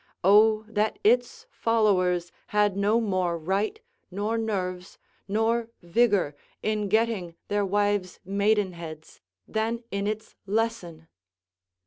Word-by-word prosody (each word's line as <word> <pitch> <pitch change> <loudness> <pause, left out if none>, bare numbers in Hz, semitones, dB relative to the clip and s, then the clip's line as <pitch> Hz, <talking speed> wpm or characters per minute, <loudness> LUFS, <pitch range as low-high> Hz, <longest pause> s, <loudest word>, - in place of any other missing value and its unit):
Oh, 215 +3 +5
that 215 0 0
its 245 +3 +2
followers 185 -6 +1 0.2
had 210 -2 +2
no 205 +3 +2
more 185 -6 0
right, 195 - -1 0.3
nor 205 +4 -2
nerves, 185 -5 -3 0.3
nor 225 +3 +1 0.2
vigour 195 -3 +2 0.3
in 210 -2 0
getting 215 -5 0
their 205 0 +1
wives' 205 -1 0
maidenheads 190 -6 -1 0.3
than 225 +2 -2
in 200 +1 -1
its 215 +1 -4
lesson. 195 -7 -2
205 Hz, 105 wpm, -26 LUFS, 185-220 Hz, 0.3 s, Oh